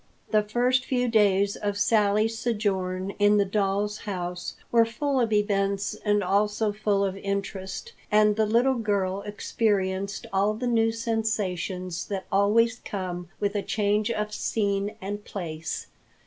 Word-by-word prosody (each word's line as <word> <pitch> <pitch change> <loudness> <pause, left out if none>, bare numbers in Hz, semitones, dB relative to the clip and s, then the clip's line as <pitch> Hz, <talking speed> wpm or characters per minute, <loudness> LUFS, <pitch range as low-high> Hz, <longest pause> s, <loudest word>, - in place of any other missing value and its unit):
The 215 -1 +5
first 245 +4 +1
few 250 -1 0
days 200 -3 +3
of 205 -1 -2
Sally's 210 +1 +2
sojourn 195 -5 -1
in 205 0 +5
the 200 - +3
doll's 205 +1 0
house 180 -3 -4 0.2
were 230 -1 +6
full 265 +4 -1
of 230 -3 +1
events 200 -2 +1
and 205 -1 0
also 210 +3 +1
full 205 -1 +1
of 190 -1 -2
interest, 200 - -4 0.2
and 210 0 +5
the 220 0 +2
little 240 +4 +3
girl 200 -3 0
experienced 200 -2 -1
all 200 +2 +2
the 245 +3 -4
new 225 -2 +3
sensations 195 -6 -2
that 195 -2 -4
always 230 +4 +3
come 180 -3 -5
with 205 -1 0
a 205 - +1
change 210 +1 0
of 210 -2 -2
scene 205 -1 -1
and 205 +1 -4
place. 160 -6 -5
205 Hz, 145 wpm, -26 LUFS, 195-220 Hz, 0.2 s, were